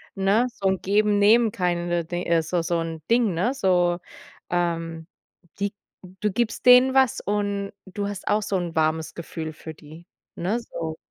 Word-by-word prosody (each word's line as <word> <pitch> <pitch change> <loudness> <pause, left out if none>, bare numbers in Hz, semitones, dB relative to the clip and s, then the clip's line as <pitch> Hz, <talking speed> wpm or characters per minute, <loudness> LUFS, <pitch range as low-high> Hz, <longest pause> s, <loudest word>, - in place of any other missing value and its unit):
ne, 200 +5 +2
so 195 - -2
'n 190 -2 0
Geben, 205 +1 +2
Nehmen, 220 +2 +4
kinda 175 -2 0
di 175 +2 -4
also 170 +1 +1
so 165 0 -1
'n 165 -1 -5
Ding, 230 -5 +3
ne? 230 +11 0
So, 180 -7 +2 0.5
ähm, 165 -2 -2 0.5
die 200 0 -1 0.5
du 210 - +1
gibst 230 +4 -2
denen 250 +1 +7
was 265 -3 +3
und 200 -1 -2
du 200 +2 -4
hast 200 -2 -7
auch 210 +1 +2
so 205 -2 -1
'n 175 -2 -4
warmes 160 0 0
Gefühl 160 -1 -6
für 160 +1 -9
die, 155 +2 -14 0.3
ne, 195 +7 -1
so? 160 -8 -6
185 Hz, 170 wpm, -24 LUFS, 165-210 Hz, 0.5 s, denen